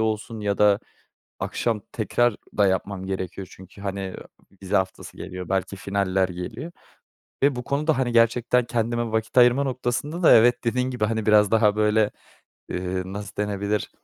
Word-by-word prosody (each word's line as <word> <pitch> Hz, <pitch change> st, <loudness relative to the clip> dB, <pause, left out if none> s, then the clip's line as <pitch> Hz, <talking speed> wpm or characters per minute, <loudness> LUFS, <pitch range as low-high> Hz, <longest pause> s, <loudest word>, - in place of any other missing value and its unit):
olsun 110 Hz, 0 st, -2 dB
ya 100 Hz, -1 st, -1 dB
da 105 Hz, -1 st, +5 dB, 0.6 s
akşam 115 Hz, -3 st, -1 dB
tekrar 120 Hz, 0 st, +1 dB, 0.2 s
da 100 Hz, -1 st, +5 dB
yapmam 95 Hz, 0 st, -2 dB
gerekiyor. 95 Hz, 0 st, -4 dB
Çünkü, 95 Hz, +2 st, -14 dB
hani, 95 Hz, -1 st, -4 dB, 0.5 s
vize 95 Hz, +2 st, -1 dB
haftası 95 Hz, -1 st, -2 dB
geliyor, 90 Hz, -1 st, -7 dB
belki 95 Hz, 0 st, -1 dB
finaller 95 Hz, -1 st, 0 dB
geliyor 110 Hz, -, -6 dB, 0.7 s
ve 140 Hz, -1 st, +3 dB
bu 125 Hz, -, -5 dB
konuda, 150 Hz, +2 st, 0 dB
hani, 125 Hz, -2 st, 0 dB
gerçekten 120 Hz, +1 st, +3 dB
kendime 120 Hz, -1 st, -1 dB
vakit 110 Hz, +3 st, 0 dB
ayırma 125 Hz, +3 st, +6 dB
noktasında 130 Hz, +6 st, -2 dB
da, -, -, +7 dB
evet, 120 Hz, +2 st, +4 dB
dediğin 125 Hz, +2 st, 0 dB
gibi, 125 Hz, -4 st, -1 dB
hani, 110 Hz, 0 st, -1 dB
biraz 105 Hz, -2 st, +5 dB
daha 110 Hz, -2 st, +3 dB
böyle, 105 Hz, 0 st, +3 dB, 0.6 s
eee, 90 Hz, +1 st, -2 dB
nasıl 100 Hz, +2 st, -7 dB
denebilir, 105 Hz, 0 st, -2 dB
105 Hz, 155 wpm, -24 LUFS, 100-120 Hz, 0.7 s, da